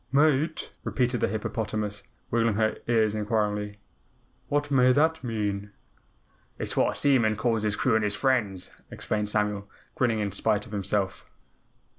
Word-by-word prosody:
"Mate?" 150 Hz, +2 st, +2 dB
repeated 125 Hz, -2 st, 0 dB
the -, -, +2 dB
hippopotamus, 105 Hz, -1 st, -3 dB, 0.3 s
wiggling 115 Hz, -2 st, +2 dB
her 110 Hz, 0 st, +1 dB
ears 110 Hz, -3 st, +3 dB
inquiringly, 105 Hz, -1 st, -1 dB, 0.7 s
"What 145 Hz, 0 st, 0 dB
may 130 Hz, -2 st, +5 dB
that 160 Hz, +3 st, +2 dB
mean?" 105 Hz, -3 st, -3 dB, 0.8 s
"It -, -, -4 dB
is -, -, -3 dB
what -, -, +2 dB
a -, -, -6 dB
seaman 120 Hz, -7 st, +3 dB
calls 115 Hz, +1 st, 0 dB
his 105 Hz, -1 st, 0 dB
crew 125 Hz, -, +1 dB
and 110 Hz, 0 st, +3 dB
his 105 Hz, 0 st, +1 dB
friends," 105 Hz, -8 st, 0 dB, 0.2 s
explained 105 Hz, -1 st, -2 dB
Samuel, 105 Hz, -1 st, -1 dB, 0.2 s
grinning 120 Hz, -3 st, +1 dB
in 100 Hz, -1 st, -1 dB
spite 105 Hz, +1 st, +1 dB
of 110 Hz, -, -13 dB
himself. 100 Hz, -1 st, -1 dB
110 Hz, 150 wpm, -27 LUFS, 105-125 Hz, 0.8 s, may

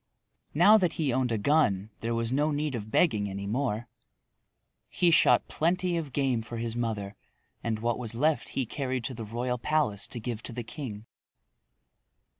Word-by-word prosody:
Now 205 Hz, +7 st, +7 dB
that 180 Hz, -4 st, +1 dB
he 145 Hz, -6 st, 0 dB
owned 125 Hz, -1 st, +1 dB
a 115 Hz, -, +1 dB
gun 105 Hz, -5 st, +2 dB
there 115 Hz, +1 st, -2 dB
was 115 Hz, 0 st, -1 dB
no 145 Hz, +3 st, +2 dB
need 150 Hz, -1 st, -1 dB
of 110 Hz, -3 st, -5 dB
begging 105 Hz, -, +2 dB
any 100 Hz, +1 st, -5 dB
more. 120 Hz, +1 st, -1 dB, 1.0 s
He 175 Hz, -1 st, +3 dB
shot -, -, +5 dB
plenty 180 Hz, +2 st, 0 dB
of 160 Hz, -4 st, -3 dB
game 130 Hz, -4 st, +1 dB
for 115 Hz, +1 st, -7 dB
his 115 Hz, 0 st, -3 dB
mother 110 Hz, -4 st, -3 dB, 0.5 s
and 115 Hz, -2 st, -1 dB
what 120 Hz, +2 st, -1 dB
was 115 Hz, -2 st, -5 dB
left 150 Hz, +5 st, +1 dB
he 135 Hz, -, +1 dB
carried 130 Hz, 0 st, -3 dB
to 130 Hz, -, -3 dB
the 115 Hz, -2 st, -6 dB
royal 120 Hz, +3 st, -2 dB
palace 130 Hz, -9 st, 0 dB
to 120 Hz, -, -6 dB
give 115 Hz, 0 st, -4 dB
to -, -, -8 dB
the 120 Hz, 0 st, -4 dB
king. 115 Hz, -4 st, -7 dB
120 Hz, 180 wpm, -28 LUFS, 110-145 Hz, 1.0 s, Now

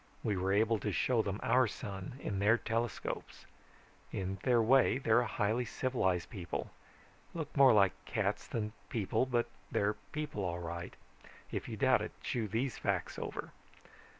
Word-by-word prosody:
We 105 Hz, -, +1 dB
were 95 Hz, +1 st, 0 dB
able 110 Hz, +2 st, +3 dB
to 105 Hz, -, -2 dB
show 120 Hz, +4 st, +2 dB
them 100 Hz, -1 st, -3 dB
our 130 Hz, 0 st, +4 dB
sun, 100 Hz, 0 st, -6 dB
in 100 Hz, -2 st, -2 dB
their 105 Hz, +4 st, +5 dB
telescopes. 115 Hz, -1 st, -3 dB, 0.7 s
In 95 Hz, 0 st, -3 dB
their 125 Hz, -2 st, +4 dB
way, 125 Hz, +3 st, +5 dB
they're 120 Hz, -3 st, +4 dB
a 120 Hz, -, 0 dB
highly 110 Hz, +4 st, 0 dB
civilized 100 Hz, -7 st, 0 dB
people. 95 Hz, -7 st, -4 dB, 0.6 s
Look 160 Hz, -3 st, -5 dB
more 135 Hz, -2 st, +8 dB
like 100 Hz, -4 st, +5 dB
cats 105 Hz, -1 st, -1 dB
than 105 Hz, -2 st, -3 dB, 0.2 s
people, 115 Hz, +2 st, 0 dB
but 120 Hz, -2 st, +2 dB, 0.2 s
they're 105 Hz, +1 st, +1 dB, 0.2 s
people 150 Hz, -9 st, -3 dB
all 85 Hz, -2 st, -1 dB
right. 85 Hz, 0 st, -5 dB, 0.6 s
If -, -, -3 dB
you -, -, -5 dB
doubt -, -, +4 dB
it, -, -, -5 dB
chew 115 Hz, -3 st, -1 dB
these 115 Hz, +5 st, -1 dB
facts -, -, -1 dB
over. -, -, -5 dB
110 Hz, 160 wpm, -34 LUFS, 100-120 Hz, 0.7 s, more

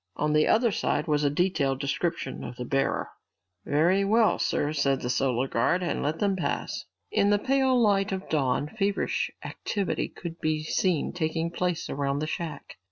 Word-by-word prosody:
On 150 Hz, +1 st, 0 dB
the 155 Hz, 0 st, +4 dB
other 230 Hz, 0 st, +4 dB
side -, -, 0 dB
was 150 Hz, -2 st, +1 dB
a 145 Hz, -, +3 dB
detailed 145 Hz, -4 st, +1 dB
description 140 Hz, -1 st, -2 dB
of 120 Hz, -, -7 dB
the 125 Hz, -, -5 dB
bearer. 135 Hz, +2 st, 0 dB, 0.6 s
"Very 175 Hz, +7 st, +3 dB
well, 220 Hz, +2 st, +3 dB
sir," 145 Hz, +1 st, 0 dB
said 140 Hz, -2 st, +1 dB
the 125 Hz, +1 st, 0 dB
guard 155 Hz, +10 st, +1 dB
and 175 Hz, -, -1 dB
let 150 Hz, +3 st, -1 dB
them 200 Hz, 0 st, +1 dB
pass. 180 Hz, -, -3 dB, 0.3 s
In 200 Hz, -, +3 dB
the 205 Hz, -, +4 dB
pale 265 Hz, +2 st, +2 dB
light 200 Hz, -4 st, +3 dB
of 190 Hz, 0 st, -4 dB
dawn, 140 Hz, -2 st, +1 dB
feverish 200 Hz, +2 st, -1 dB, 0.2 s
activity 200 Hz, -3 st, -2 dB
could 170 Hz, -2 st, -8 dB
be 155 Hz, -1 st, 0 dB
seen 170 Hz, 0 st, 0 dB
taking 165 Hz, -1 st, -1 dB
place 180 Hz, -1 st, -1 dB
around 140 Hz, 0 st, -1 dB
the 150 Hz, -, -1 dB
shack. 155 Hz, -2 st, -5 dB
160 Hz, 170 wpm, -27 LUFS, 140-195 Hz, 0.6 s, the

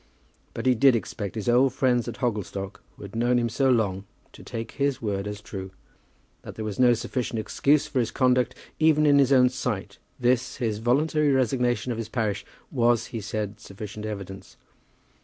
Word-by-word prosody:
But -, -, -4 dB
he 130 Hz, -, +5 dB
did 130 Hz, +1 st, +5 dB
expect 105 Hz, -3 st, -4 dB
his 110 Hz, 0 st, -4 dB
old 125 Hz, +2 st, +4 dB
friends 125 Hz, -3 st, +1 dB
at -, -, -5 dB
Hogglestock, 100 Hz, -4 st, -3 dB
who -, -, -12 dB
had 100 Hz, +2 st, -9 dB
known 120 Hz, +2 st, +2 dB
him 120 Hz, -1 st, +1 dB
so 135 Hz, +4 st, +1 dB
long, 100 Hz, -6 st, +1 dB, 0.3 s
to -, -, -13 dB
take 115 Hz, -1 st, -6 dB
his 140 Hz, -1 st, -1 dB
word 100 Hz, -2 st, -2 dB
as 105 Hz, 0 st, -6 dB
true. 95 Hz, -2 st, -7 dB, 0.7 s
That -, -, -10 dB
there 110 Hz, -, -5 dB
was 105 Hz, +1 st, -5 dB
no 125 Hz, -1 st, +6 dB
sufficient 115 Hz, +1 st, -3 dB
excuse 140 Hz, +7 st, +2 dB
for 150 Hz, -3 st, -2 dB
his 115 Hz, -2 st, +1 dB
conduct, 125 Hz, -1 st, +2 dB, 0.2 s
even 155 Hz, -1 st, +4 dB
in 145 Hz, -1 st, +5 dB
his 135 Hz, -1 st, +4 dB
own 125 Hz, -2 st, +6 dB
sight, 105 Hz, -5 st, -4 dB, 0.2 s
this, 125 Hz, 0 st, +1 dB
his 110 Hz, -3 st, -2 dB
voluntary 145 Hz, +5 st, +2 dB
resignation 125 Hz, -1 st, +1 dB
of 115 Hz, -, -3 dB
his 115 Hz, -1 st, -5 dB
parish, 110 Hz, -4 st, -1 dB, 0.3 s
was, 120 Hz, -3 st, +2 dB
he 115 Hz, -, -3 dB
said, 105 Hz, 0 st, -4 dB
sufficient 105 Hz, +1 st, -8 dB
evidence. 100 Hz, -2 st, -8 dB
120 Hz, 185 wpm, -26 LUFS, 105-130 Hz, 0.7 s, no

